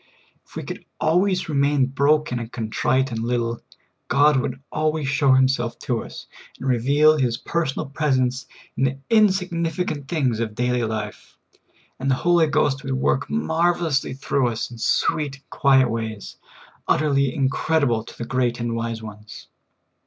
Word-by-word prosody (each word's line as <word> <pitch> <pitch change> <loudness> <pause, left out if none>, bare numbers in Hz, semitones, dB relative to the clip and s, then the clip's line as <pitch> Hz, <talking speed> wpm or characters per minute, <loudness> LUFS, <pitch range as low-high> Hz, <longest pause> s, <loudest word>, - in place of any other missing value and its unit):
If - - -20
we - - -4
could - - -7 0.2
always 180 +3 +2
remain 140 -2 +2
broken 140 -1 +1
and 115 0 -7
contrite 130 +3 0
and 115 -1 -3
lit 120 +2 0
tle, 115 0 -2 0.5
God 145 +3 +4
would 130 0 -2
always 155 -2 -1
show 135 0 +3
Himself 130 -2 +2
to 120 -3 -2
us, - - -10 0.3
and 135 - -5
reveal 140 +5 +4
His 120 -4 0
personal 160 -1 -2
presence 130 -3 0 0.3
in 135 - +1
the 135 +1 -1
insignificant 180 -7 +1
things 135 -9 0
of 110 -2 -3
daily 125 0 0
life, 110 -1 -6 0.6
and 135 +1 -1
the 130 - +3
Holy 175 -2 +4
Ghost 145 -2 +1
would 135 -1 -3
work 130 +1 0
marvelously 165 - 0
through 135 -1 0
us 115 0 -3
in 120 - -10
sweet 145 +4 0
and 140 - -23
quiet 135 -2 +4
ways, 110 -2 -5 0.5
utterly 140 -3 +2
incredible 135 -3 +1
to - - -13
the 120 - -5
great 125 -1 0
and 115 0 -2
wise 115 -1 -3
ones. 105 0 -11
135 Hz, 155 wpm, -22 LUFS, 120-150 Hz, 0.6 s, God